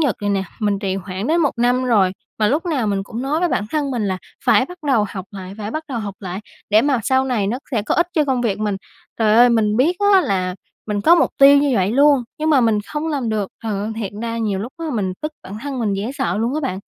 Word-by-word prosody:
Nhật 280 -9 +1
này 205 0 -1
nè 195 -1 +1 0.2
mình 205 -2 +1
trì 195 -2 -2
hoãn 190 +2 -5
đến 330 +4 +2
1 295 -4 +2
năm 245 +2 +2
rồi, 205 -7 +3 0.3
mà 210 -1 +3
lúc 320 +6 0
nào 270 -10 0
mình 200 -1 0
cũng 230 +5 -6
nói 295 +4 0
với 355 - +2
bản 205 - 0
thân 295 -3 -1
mình 235 -5 -1
là 185 -1 -2 0.3
phải - - +4
bắt 360 0 -11
đầu 230 -7 +3
học 190 -2 -6
lại, 190 -2 -8
phải 210 0 -4
bắt 310 +6 -4
đầu 250 -4 -3
học 205 -3 -5
lại, 185 -1 -5 0.3
để 215 +2 +5
mà 275 -4 +1
sau 260 +5 +2
này 240 -6 0
nó 235 +5 -1
sẽ 230 -6 0
có 210 - -1
ích 345 0 +2
cho 310 -4 +3
công 260 -3 0
việc 225 -5 -1
mình. 210 -2 -1 0.4
Trời 215 -2 +3
ơi, 245 +1 +7
mình 215 -3 +2
biết 310 +9 +2 0.2
á 385 - +7
là 185 - -1 0.3
mình 210 -1 -1
có 330 +11 +6
mục 345 - +3
tiêu 280 0 +8
như 285 0 +2
vậy 195 +1 +1
luôn, 280 -1 +4 0.2
nhưng 310 +1 0
mà 280 -4 +5
mình 225 -3 +2
không 305 +1 -3
làm 280 -6 -2
được, 210 -3 -1
trời 220 -2 -2
ơi, 210 +2 -3
thiệt 205 -3 -4
ra 230 0 -3
nhiều 210 -4 -1
lúc 230 +7 -5
á 330 - -4
mình 195 -5 -1
tức 305 - -3
bản 195 +3 -8
thân 280 -2 -4
mình 215 -4 0
dễ 205 +5 -3
sợ 265 -10 -1
luôn 235 +5 -1
á 310 - -1
bạn. 225 -10 -3
230 Hz, 280 wpm, -20 LUFS, 205-280 Hz, 0.4 s, tiêu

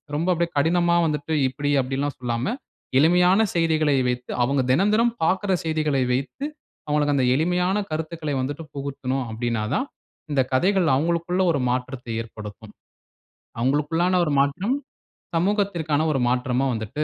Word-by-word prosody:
ரொம்ப 165 +4 -1
அப்படியே 170 0 0
கடினமா 170 +3 +3
வந்துட்டு, 150 0 -2
"இப்படி 145 +2 -2
அப்படிலாம்" 135 +2 -2
சொல்லாம, 120 - -2 0.4
எளிமையான 180 +5 +5
செய்திகளை 155 -3 +2
வைத்து 125 0 -4
அவங்க 135 +2 +1
தெனந்தெனம் 210 - +3
பார்க்கிற 190 +4 +1
செய்திகளை 155 -4 +1
வைத்து, 135 - -3 0.4
அவுங்களுக்கு 150 -1 +1
அந்த 130 -2 +2
எளிமையான 180 +6 +1
கருத்துக்களை 155 -2 -3
வந்துட்டு 145 +5 -4
புகுத்தணும். 135 -2 -3
அப்டினாதான், 115 - -1 0.4
இந்த 140 -2 +3
கதைகள் 180 +5 +3
அவுங்களுக்குள்ள 170 +5 0
ஒரு 140 - 0
மாற்றத்தை 125 -1 -3
ஏற்படுத்தும். 105 -1 -10 0.9
அவங்களுக்குள்ளான 160 +8 +1
ஒரு 150 - -1
மாற்றம், 180 - +1 0.6
சமூகத்திற்கான 175 -5 0
ஒரு 135 - 0
மாற்றமா 125 +1 0
வந்துட்டு 115 +7 -3
150 Hz, 125 wpm, -23 LUFS, 130-170 Hz, 0.9 s, எளிமையான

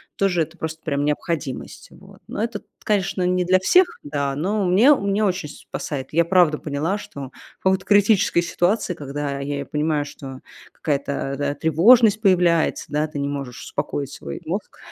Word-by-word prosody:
тоже 185 -4 +1
это 160 +3 -4
просто 160 0 -5
прям 145 -1 -1
необходимость. 150 -2 -3
Вот. - - -16
Но 215 - -3
это, 230 - -3
т - - -29 0.2
конечно, 195 -3 0
не 180 0 +1
для 185 +1 +4
всех, 360 - +5 0.2
да, 140 -1 -2
но 195 +7 0
у - - +1
меня 230 +11 +6
у 200 - -5
меня 200 +2 +1
очень 180 -6 -1
спасает. 135 -2 -6
Я 170 +2 +4
правда 170 -3 +4
поняла, 155 +6 -2
что 140 -9 -9 0.3
в - - -37
какой-то 190 0 +2
критической 205 -3 +4
ситуации, 175 +3 0
когда 140 -2 -4
я 140 0 -3
и - - -3
понимаю, 150 -1 -1
что 135 -2 -9 0.3
какая-то, 140 -2 -2
да, 145 0 -1
тревожность 205 - +5
появляется, 175 -5 +3
да, 150 +1 0
ты 150 -2 -6
не 140 - -1
можешь 140 -4 -5
успокоить 140 -1 -4
свой 70 - -7
мозг. - - -5
160 Hz, 180 wpm, -22 LUFS, 145-190 Hz, 0.3 s, меня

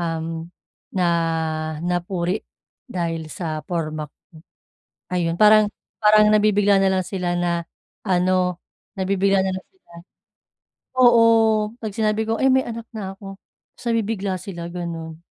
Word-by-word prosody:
um, 165 -1 -2 0.6
na 180 -2 0 0.8
napuri 175 +2 -1 0.5
dahil 165 -4 -3
sa 155 -4 -4
porma 155 -3 -4
ko. - - -59 1.0
Ayun 170 -2 0
parang 215 +2 +6 0.3
parang 210 0 +5
nabibigla 205 -1 +4
nalang 190 -1 +2
sila 180 -1 -3
na 170 -1 -1 0.4
ano, 180 -1 +1 0.3
nabibigla 195 0 +1
nalang 190 0 -3
sila 375 - -32 1.1
oo, 240 -2 +7 0.6
kapag 215 -3 -5
sinabi 215 0 +1
ko, 225 - +1
"Eh 265 +3 +3
may 260 0 +3
anak 230 -1 -6
na 195 -3 -6
ako," 195 0 -10 0.3
tapos - - -17
nabibigla 210 -4 -1
sila 175 -2 -7
ganon. 165 -2 -6
190 Hz, 120 wpm, -22 LUFS, 170-210 Hz, 1.1 s, oo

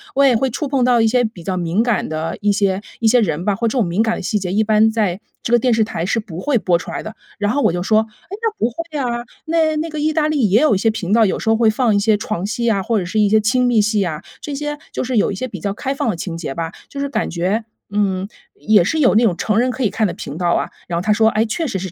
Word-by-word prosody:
对， 275 -2 +5
会 260 +3 0
触 295 +5 -3
碰 265 -3 +1
到 245 -2 +4
一 225 - +4
些 245 +2 +2
比 220 -6 -5
较 185 0 -2
敏 175 +4 0
感 235 -3 0
的 160 +1 -3
一 205 0 +2
些 195 -2 +1 0.2
一 230 - +2
些 245 +3 +5
人 170 -5 -1
吧， 205 -2 +1
或 230 +2 -1
这 - - -1
种 205 - +2
敏 180 +6 +1
感 225 0 0
的 - - -5
细 210 +3 -1
节， 185 -2 -3
一 215 +2 +3
般 215 +1 +3
在 205 -5 0 0.2
这 - - -4
个 240 - +6
电 245 +1 +2
视 225 0 +3
台 175 -5 -3
是 225 - 0
不 180 -6 -8
会 255 +4 +1
播 180 -4 +2
出 175 - -8
来 - - -4
的。 215 +1 -8 0.2
然 205 0 +1
后 285 +3 0
我 - - +3
就 175 - -2
说： 215 +3 +3 0.3
“哎， 400 - -6
那 450 - +2
不 230 - +2
会 330 +6 -8
啊， 240 -2 -2 0.2
那 320 -1 +1
那 320 +2 -2
个 305 -1 -5
意 310 +1 +1
大 305 -1 +2
利 290 -7 +2
也 210 +7 +4
有 305 -9 +4
一 - - +2
些 225 +3 +2
频 200 -3 -4
道， 225 0 +5
有 190 - 0
时 220 - -2
候 225 - +4
会 230 -1 +3
放 225 -1 +1
一 - - +3
些 215 +1 +3
床 205 -3 -3
戏 230 +3 -1
啊， 200 -3 +1
或 225 +1 +1
者 180 - -3
是 215 +5 -1
一 210 - +4
些 215 +2 +3
亲 250 +4 +2
密 235 -3 +3
戏 210 -1 +1
啊， 155 -2 -4 0.2
这 290 - -6
些 295 +1 -3
就 - - -3
是 255 -2 -1
有 205 - +2
一 - - -4
些 255 +7 -4
比 200 -6 -8
较 195 +4 -2
开 270 +6 -3
放 275 - -2
的 - - -4
情 165 0 -5
节 155 -5 -5
吧， 165 +2 -4 0.2
就 280 - -8
是 280 - -2
感 - - -1
觉， 185 +6 -1 0.3
嗯， 195 -2 0 0.3
也 210 -4 +3
是 315 - 0
有 255 -6 +4
那 225 - +5
种 205 -7 +3
成 215 +4 0
人 250 +2 +2
可 255 - -6
以 215 - +2
看 220 +1 0
的 175 - -1
频 155 -3 -7
道 175 -1 0
啊？” - - 0 0.2
然 175 - -3
后 170 - 0
她 210 +3 0
说： 220 +1 +4
“诶， 215 +1 +2
确 325 +10 -2
实 210 -10 -2
是 185 -1 -5
220 Hz, 340 characters per minute, -19 LUFS, 195-245 Hz, 0.3 s, 个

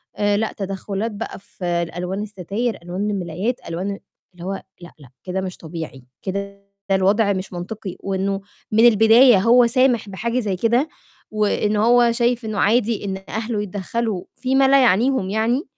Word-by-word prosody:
آآ، 205 0 +1
لأ 220 0 -1
تدخُّلات 195 +2 -3
بقى 210 0 -6
في 190 -2 -10
ال 170 -1 -1
ألوان 180 +3 -3
السَتاير، 210 +4 -3
ألوان 185 +4 -3
المِلايات، 190 +4 -2
ألوان 180 +4 -3
آآ، 200 - -6 0.3
اللي 175 0 -10
هو 195 - -2 0.3
لأ، 175 - -11
لأ، 135 -4 -15
كده 190 +1 -3
مش 185 -1 -5
طبيعي، 160 -5 -8 0.2
كده 200 +1 -5 0.3
الوَضع 200 +2 +3
مش 190 -1 -5
مَنطقي 185 +1 -6
وإنه 195 0 -2 0.3
من 225 +2 +5
البداية 225 +1 +6
هو 235 +4 +5
سامِح 240 -4 +2
بحاجة 235 +5 -2
زي 205 -5 -1
كده 235 - +1 0.4
وإنه 210 0 +1
هو 240 0 +5
شايف 235 0 0
إنه 215 -1 -3
عادي 225 -1 +2
إن 195 -1 -4
أهلُه 220 0 -2
يتدخَّلوا 205 +1 -3
في 260 +1 -1
ما 270 0 +5
لا 275 0 +6
يعنيهم 235 -2 +2
يعني، 230 - +1
205 Hz, 165 wpm, -21 LUFS, 190-230 Hz, 0.4 s, البداية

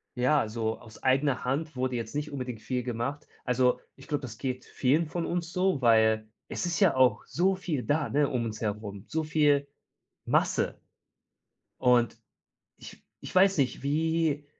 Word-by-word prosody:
ja, 130 +5 +3
also 110 0 -2
aus 115 -2 -15
eigener 135 -1 +2
Hand 145 +4 -2
wurde 130 0 -1
jetzt 115 +3 -5
nicht 150 0 -3
unbedingt 125 -5 -5
viel 125 -1 -2
gemacht. 125 +5 -4 0.2
Also, 125 0 +2 0.2
ich 135 - -15
glaube, 145 -2 -1
das 115 -4 -7
geht 130 -2 -3
vielen 150 +6 +1
von 170 +2 -3
uns 170 -1 -2
so, 185 -4 +1
weil 110 -2 +4 0.2
es - - -3
ist 170 -1 -1
ja 195 -8 +4
auch 130 -1 +4
so 190 +3 +2
viel 160 -8 -3
da, 145 -4 0
ne, 145 +4 +2
um 120 -2 -1
uns 110 -1 -5
herum, 105 -2 -4
so 160 0 -1
viel 150 -2 +2 0.6
Masse. - - +1 1.0
Und 125 -2 +3 0.6
ich - - -13 0.2
ich - - -8
weiß 190 -2 +5
nicht, 130 -2 0
wie 155 0 0
135 Hz, 170 wpm, -28 LUFS, 120-155 Hz, 1.0 s, weiß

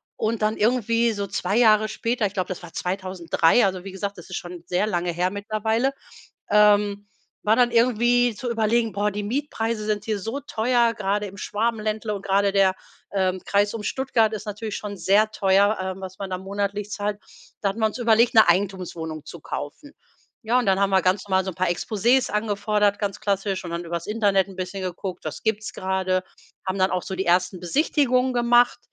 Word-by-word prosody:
und 220 0 -2
dann 215 +1 +1
irgendwie 230 +1 +2
so 200 -2 -3
2 195 +1 -1
Jahre 215 -2 +5
später, 230 +1 -1
ich 195 - -2
glaube, 185 -3 -2
das 185 -1 -6
war 170 - -11
2003- 185 +1 +1
also 185 -2 -2
wie 195 - -7
gesagt, 200 +1 -5
das 175 - -12
ist 185 - -4
schon 175 -1 -8
sehr 180 +4 0
lange 175 -4 -1
her 175 +2 0
mittlerweile- 215 +5 -1 0.6
ähm, 205 -1 +4 0.4
war 215 +1 +4
dann 245 -1 +3
irgendwie 240 0 +3
zu 245 +3 -4
überlegen: 225 0 +1
„Boah, 205 +2 0
die 205 +1 -4
Mietpreise 225 -2 -2
sind 210 -1 -1
hier 215 -2 -2
so 225 +8 -4
teuer, 240 -3 +1
grade 205 0 -1
im 195 +1 -11
Schwabenländle 215 +1 -2
und 200 -1 -6
grade 200 +1 +2
der, 195 -1 +3 0.4
ähm, 190 -1 0
Kreis 205 0 +2
um 225 - -4
Stuttgart 230 -3 +1
ist 215 - -5
natürlich 210 0 -5
schon 205 -1 -6
sehr 200 +5 +3
teuer, 200 0 +3
ähm, 190 0 -4
was 190 0 -8
man 195 -1 -5
da 185 - -1
monatlich 200 +2 -3
zahlt.“ 205 0 -2 0.4
Da 200 - +1
hatten 200 +4 -5
wir 220 - +3
uns 215 - -1
überlegt 230 -1 +3
'ne 220 -5 +7
Eigentumswohnung 175 -4 -1
zu 170 - -9
kaufen. 155 - -7 0.5
Ja, 235 +3 +2
und 250 - -1
dann 195 0 +2
haben 200 - +3
wir 190 -1 +4
ganz 185 +2 +1
mal 190 0 +2
so 190 - -3
'n - - -15
paar 185 0 0
Exposés 225 +8 +1
angefordert, 210 -1 0
ganz 200 -2 -3
klassisch, 195 -1 -1
und 170 - -6
dann 170 +1 -4
übers 170 0 -4
Internet 205 -3 +2
'n 190 - -11
bisschen 185 +1 -4
geguckt: 185 +1 -5
„Was - - -5
gibt's 215 -1 -1
grade“, 185 -1 -1 0.4
haben 185 +1 -1
dann 185 0 +2
auch 185 -1 -1
so 190 - -5
die 190 - -2
1. 180 +1 +2
Besichtigungen 255 - +1
gemacht, 240 0 +3
205 Hz, 200 wpm, -24 LUFS, 190-220 Hz, 0.6 s, ne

